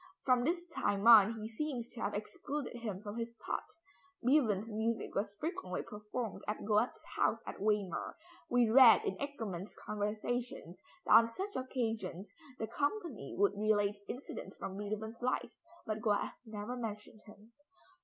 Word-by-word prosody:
From 250 -2 +4
this 345 +5 0
time 205 -8 0
on, 225 -2 +9
he 215 - -4
seems 240 0 -3
to 235 - -9
have 200 - -1
excluded 275 +6 -4
him 210 -4 -5
from 210 +1 -6
his 230 0 -4
thoughts. 330 - -4 0.4
Beethoven's 230 -6 +3
music 225 +2 -1
was 200 0 -2
frequently 300 - -3
performed 210 +1 -5
at 210 0 -3
Goethe's 215 +3 +1
house - - +3
at - - -7
Weimar. 205 -3 0 0.3
We 245 -1 +4
read 230 -2 +8
in 190 - -1
"Eckermann's 215 -10 -5
Conversations" 215 -2 -3 0.2
that - - +4
on 230 - +9
such 390 - -5
occasions 225 -7 -3 0.2
the 225 - -2
company 285 - -2
would 200 +1 +4
relate 205 -1 +2
incidents 255 - -6
from 190 - -6
Beethoven's 215 +3 -4
life, 255 +1 -1 0.3
but 215 -1 -2
Goethe 210 -3 +1
never 215 +3 -5
mentioned 215 -2 -6
him. 210 +2 -15
220 Hz, 150 wpm, -34 LUFS, 205-245 Hz, 0.4 s, on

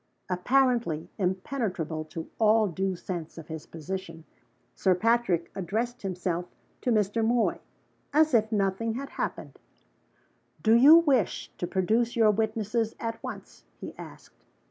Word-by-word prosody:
Apparently 230 - +1
impenetrable 185 - -2
to 160 +1 -7
all 220 0 +5
due 190 +1 -2
sense 170 -2 -6
of 165 -1 -10
his 160 -1 -7
position, 165 0 -6 0.5
Sir 185 -2 +2
Patrick 215 -5 +1
addressed 225 +7 -3
himself 180 -2 -3 0.3
to 250 - 0
Mr. 215 0 +1
Moy, 235 +1 +1 0.5
as 310 0 +3
if 220 -1 +3
nothing 210 +2 0
had 275 +2 -5
happened. - - -5 1.0
"Do 220 - +5
you 275 +7 +9
wish 280 - +1
to 175 - -2
produce 220 +6 +1
your 225 -2 +5
witnesses 220 +1 -1
at 230 -1 -4
once?" - - -8 0.2
he - - -8
asked. - - -13
210 Hz, 130 wpm, -28 LUFS, 180-235 Hz, 1.0 s, you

